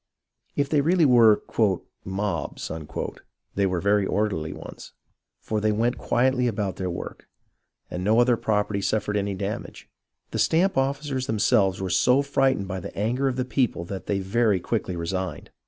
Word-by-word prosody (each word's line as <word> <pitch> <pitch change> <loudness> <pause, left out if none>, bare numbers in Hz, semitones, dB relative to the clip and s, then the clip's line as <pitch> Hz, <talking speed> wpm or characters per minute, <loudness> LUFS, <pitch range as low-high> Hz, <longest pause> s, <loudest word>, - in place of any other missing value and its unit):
If 140 - +1
they 145 0 +2
really 170 +2 +3
were 115 -5 +6 0.6
"mobs," 95 -5 -3 0.8
they 100 - +1
were 90 -2 -1
very 100 +2 +2
orderly 95 -6 -1
ones; - - -10 0.5
for 110 -1 -2
they 110 0 +2
went 115 +3 0
quietly 125 0 +2
about 100 -5 -2
their 95 -1 -2
work, 85 - -7 0.6
and 90 - -4
no 110 +4 +3
other 120 0 +4
property 105 -2 0
suffered 105 0 -1
any 100 -1 -1
damage. 100 +4 -5 0.4
The - - -3
stamp 180 +4 +3
officers 135 -1 -1
themselves 100 -3 +2
were 95 -1 -3
so 125 +9 +4
frightened 135 -7 +1
by 95 -1 -4
the - - -9
anger 120 +7 0
of 130 - 0
the 130 -1 -1
people 125 -9 0
that 95 +2 -7
they 100 - +1
very 100 +1 +1
quickly 95 -2 -2
resigned. 95 +2 -4
105 Hz, 160 wpm, -25 LUFS, 95-125 Hz, 0.8 s, were